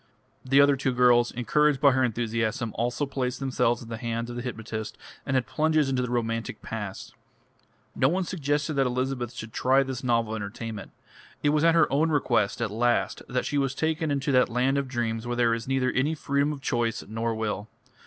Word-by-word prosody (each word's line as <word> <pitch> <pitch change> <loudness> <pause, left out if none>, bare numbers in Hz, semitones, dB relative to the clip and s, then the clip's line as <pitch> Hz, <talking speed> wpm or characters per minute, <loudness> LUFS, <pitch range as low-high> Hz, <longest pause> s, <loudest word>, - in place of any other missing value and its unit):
The 135 +2 +3
other 140 0 +6
two 130 -1 -1
girls, 120 -1 +4
encouraged 145 +4 +2
by 140 0 +6
her 130 0 +2
enthusiasm, 115 0 -1
also 120 +5 -1
placed 130 -2 -3
themselves 125 -3 0
in 115 - -12
the 115 - -4
hands 115 0 -3
of - - -7
the 120 - -4
hypnotist 110 -3 -5 0.3
and 140 - 0
had 130 -2 +2
plunges 155 -2 +1
into 130 -1 +1
the 125 - -2
romantic 115 -1 -2
past. 105 -4 -6 0.8
No 130 - +3
one 185 +4 0
suggested 150 -3 -1
that 135 -2 +2
Elizabeth 125 -1 -2
should 110 0 -8
try 135 +2 +3
this 130 -1 -5
novel 115 -3 +1
entertainment; 110 0 -6 0.5
it 145 - +4
was 150 +1 +2
at 165 0 +5
her 165 -2 +6
own 155 +4 +3
request 120 -8 +1
at 110 - -2
last 120 +2 0
that 125 0 -1
she 145 - 0
was 135 -1 -1
taken 160 +1 -1
into 140 0 0
that 125 -1 +4
land 130 +4 +1
of 140 - -3
dreams 120 -2 -2
where 120 - -1
there 120 -1 +3
is 115 +1 -4
neither 130 -1 +1
any 145 +5 0
freedom 140 0 0
of 145 -2 -6
choice 120 -3 -1
nor 115 +2 -2
will.... 105 -1 -3
125 Hz, 205 wpm, -26 LUFS, 115-140 Hz, 0.8 s, other